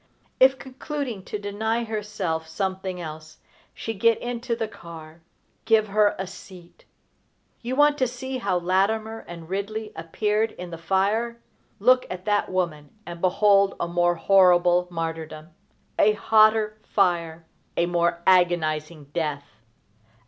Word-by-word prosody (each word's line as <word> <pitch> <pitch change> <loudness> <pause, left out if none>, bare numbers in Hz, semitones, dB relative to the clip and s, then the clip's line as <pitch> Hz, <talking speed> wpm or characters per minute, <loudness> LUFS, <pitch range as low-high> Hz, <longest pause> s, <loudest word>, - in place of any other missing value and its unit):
If, 265 +1 +6
concluding 265 -5 -6
to - - -4
deny 220 +3 -2
herself 210 -7 -3
something 190 +1 -3
else, 155 -2 -9 0.3
she 225 - -5
get 230 +2 +3
into 240 0 -3
the 225 -1 -3
car, 165 -4 -12 0.4
give 220 -2 +3
her 205 0 +3
a 190 - -3
seat! 180 -1 -14 0.8
You 250 +2 -3
want 290 +1 +4
to 260 - +2
see 260 +2 -5
how 195 -5 0
Latimer 210 +5 0
and 170 -2 -9
Ridley 210 +4 -4
appeared 210 +7 -1
in 180 -1 -9
the 165 - -7
fire: 205 +7 0 0.4
look 255 +4 +4
at 185 0 -7
that 205 -1 +1
woman 170 -6 -2 0.2
and 170 0 -8
behold 195 +1 +3
a - - -1
more 175 0 +1
horrible 180 -1 +4
martyrdom, 160 -2 -5 0.5
a 210 - +5
hotter 215 0 +3
fire, 170 -6 0 0.3
a 170 - +3
more 170 0 0
agonizing 165 -4 +2
death! 145 -6 -4
190 Hz, 135 wpm, -24 LUFS, 170-220 Hz, 0.8 s, If